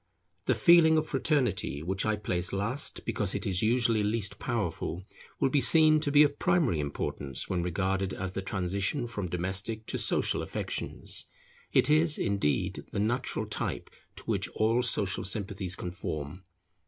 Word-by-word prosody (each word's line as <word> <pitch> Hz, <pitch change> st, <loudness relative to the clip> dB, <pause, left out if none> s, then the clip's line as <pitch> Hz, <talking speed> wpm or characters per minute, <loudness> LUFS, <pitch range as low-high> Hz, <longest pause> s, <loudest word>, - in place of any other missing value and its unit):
The -, -, +3 dB
feeling 170 Hz, -2 st, +6 dB
of 155 Hz, -, +1 dB
fraternity, 130 Hz, -, -1 dB
which 95 Hz, +4 st, -2 dB
I 110 Hz, -, +2 dB
place 90 Hz, -4 st, -2 dB
last, 110 Hz, +9 st, -2 dB
because 105 Hz, -4 st, -1 dB
it -, -, -3 dB
is 95 Hz, -3 st, 0 dB
usually 115 Hz, -1 st, +2 dB
least 105 Hz, -1 st, -1 dB
powerful, 95 Hz, -, -3 dB, 0.4 s
will 135 Hz, -, +2 dB
be 140 Hz, -, +3 dB
seen 155 Hz, 0 st, +7 dB
to 150 Hz, -1 st, -1 dB
be 145 Hz, +1 st, +7 dB
of 145 Hz, -1 st, 0 dB
primary 165 Hz, -, +2 dB
importance 70 Hz, -2 st, -3 dB
when 90 Hz, -2 st, -1 dB
regarded 95 Hz, +2 st, -1 dB
as 95 Hz, -1 st, -4 dB
the 95 Hz, -, -3 dB
transition 95 Hz, +6 st, -2 dB
from 105 Hz, -6 st, -5 dB
domestic 95 Hz, +5 st, -2 dB
to -, -, -3 dB
social -, -, +1 dB
affections; -, -, -3 dB, 0.5 s
it -, -, +4 dB
is, 155 Hz, +1 st, +4 dB
indeed, 100 Hz, -8 st, -1 dB
the -, -, -3 dB
natural 120 Hz, +5 st, -1 dB
type -, -, -4 dB, 0.2 s
to -, -, -9 dB
which -, -, -1 dB
all 115 Hz, +3 st, +2 dB
social 105 Hz, -6 st, +1 dB
sympathies 95 Hz, -2 st, -2 dB
conform. 85 Hz, -1 st, -6 dB
105 Hz, 155 wpm, -29 LUFS, 95-130 Hz, 0.5 s, seen